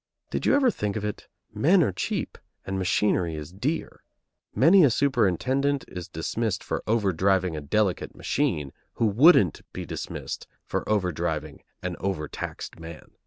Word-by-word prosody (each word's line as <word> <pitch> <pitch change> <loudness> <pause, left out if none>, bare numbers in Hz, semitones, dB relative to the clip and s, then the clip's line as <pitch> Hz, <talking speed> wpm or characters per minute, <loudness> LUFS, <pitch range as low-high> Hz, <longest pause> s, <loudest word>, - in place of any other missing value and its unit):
Did - - -1
you - - +5
never 270 -3 +4
think 105 - -3
of 105 -1 -2
it, 105 - -5 0.3
men 175 +5 +4
are 115 - +1
cheap, 90 - -3 0.3
and 95 0 -2
machinery 90 -2 +1
is 75 +1 -7
dear; 130 +12 -3 0.5
many 175 +7 +6
a 145 - +6
superintendent 130 - +1
is 90 -2 -7
dismissed 100 +5 -2
for - - -3
overdriving 95 -4 +2
a 75 - -4
delicate 95 +6 0
machine, 85 - -1 0.2
who 115 - +1
wouldn't 110 - +5
be - - -5
dismissed - - -6 0.2
for - - -2
overdriving 95 -6 -1 0.2
an 90 -1 -3
overtaxed 85 -4 -4
man. 80 -1 -10
100 Hz, 145 wpm, -26 LUFS, 90-130 Hz, 0.5 s, many